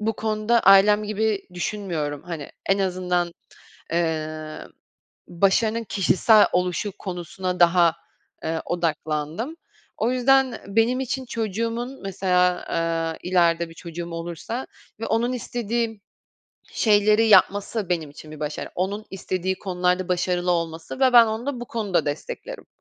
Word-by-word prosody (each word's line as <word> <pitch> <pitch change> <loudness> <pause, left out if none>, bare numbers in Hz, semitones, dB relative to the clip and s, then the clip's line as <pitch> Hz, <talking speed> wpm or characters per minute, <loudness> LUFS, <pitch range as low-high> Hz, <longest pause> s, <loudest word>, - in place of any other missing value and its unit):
bu 220 +1 0
konuda 220 +1 +1
ailem 205 +2 +6
gibi 215 0 -1
düşünmüyorum, 170 -7 -3
hani, 165 -5 -7 0.2
en 195 +1 +2
azından, 180 -2 0 0.6
emm, 155 -2 -2 0.7
başarının 215 +6 +1
kişisel 210 +2 +4
oluşu 180 +3 0
konusuna 180 0 -4
daha, 170 -1 +5 0.5
eee, 160 0 -2
odaklandım. 160 - -2 0.4
O 230 +3 +1
yüzden 260 0 +3
benim 225 +5 +2
için 265 0 -3
çocuğumun 230 +3 -3
mesela, 180 -2 +1 0.6
eee, 180 - -5
ileride 170 -2 +3
bir - - -12
çocuğum 170 0 -7
olursa 170 +9 -5 0.3
ve 225 - -3
onun 235 +3 0
istediği 230 -3 -3 0.7
şeyleri 215 +1 +4
yapması 200 0 +3
benim 160 -5 -1
için 155 +1 -12
bir 155 - -10
başarı, 150 0 -4
onun 200 +4 -2
istediği 190 0 -3
konularda 180 -1 0
başarılı 180 0 0
olması. 165 +6 -3
Ve 260 -2 +4
ben 235 -1 +8
onu 220 +4 -3
da 265 -4 -3
bu 240 - -6
konuda 200 -9 -1
desteklerim. 330 - -5
190 Hz, 125 wpm, -24 LUFS, 170-225 Hz, 0.7 s, ben